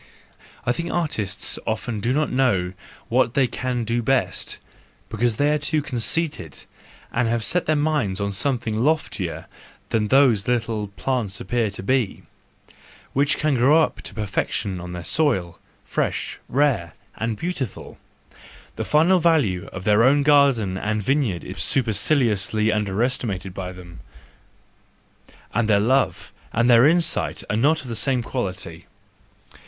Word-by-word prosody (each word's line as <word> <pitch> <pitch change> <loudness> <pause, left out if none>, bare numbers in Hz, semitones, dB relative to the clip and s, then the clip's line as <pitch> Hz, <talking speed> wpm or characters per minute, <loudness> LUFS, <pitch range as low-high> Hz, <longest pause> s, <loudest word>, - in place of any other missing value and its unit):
—I 120 - +2
think 170 +7 -3
artists 110 - -1
often 115 -3 -2
do 115 +5 -1
not 150 +3 0
know 100 -9 +1 0.3
what 125 0 +1
they 135 -2 +4
can 125 -1 -3
do 115 +2 -1
best, 135 +3 -1 0.5
because 115 0 0
they 145 +1 +2
are 150 - 0
too 150 +1 0
conceited, 130 - -2 0.5
and 120 0 +1
have 115 0 0
set 180 +8 0
their 155 - +3
minds 145 -11 0
on 100 0 -1
some¬ 125 +6 0
thing 110 0 -2
loftier 155 +2 -1 0.4
than 105 -1 0
those 125 -5 +4
little 115 -3 -1
plants 100 -1 -3
appear 120 -3 -1
to 100 -1 -8
be, 125 -1 0 0.9
which 140 +2 +2
can 155 -1 +1
grow 140 +6 +5
up - - -3
to - - -6
perfection 100 -2 -2
on 90 0 -7
their 90 -1 -6
soil, 95 - 0 0.3
fresh, - - -2
rare, 130 - +1 0.2
and 110 -1 -2
beautiful. 145 - -5 0.8
The - - -2
final 165 +5 +4
value 145 - +2
of 95 - -7
their 105 +2 +4
own 140 +3 +4
garden 135 -10 +3
and 105 +1 -2
vineyard 130 - 0
is - - -8
superciliously 110 -3 +2
under¬ 105 +1 +1
estimated 100 -7 -3
by 90 -1 -5
them, 90 -2 -12 1.5
and 110 0 0
their 100 -2 +5
love 120 -4 0 0.2
and 115 +2 +1
their 120 +3 +7
insight 165 0 +2
are - - 0
not 150 +7 +2
of - - -10
the 115 - -4
same 125 +1 +2
quality. 90 -9 -5
120 Hz, 150 wpm, -22 LUFS, 100-140 Hz, 1.5 s, their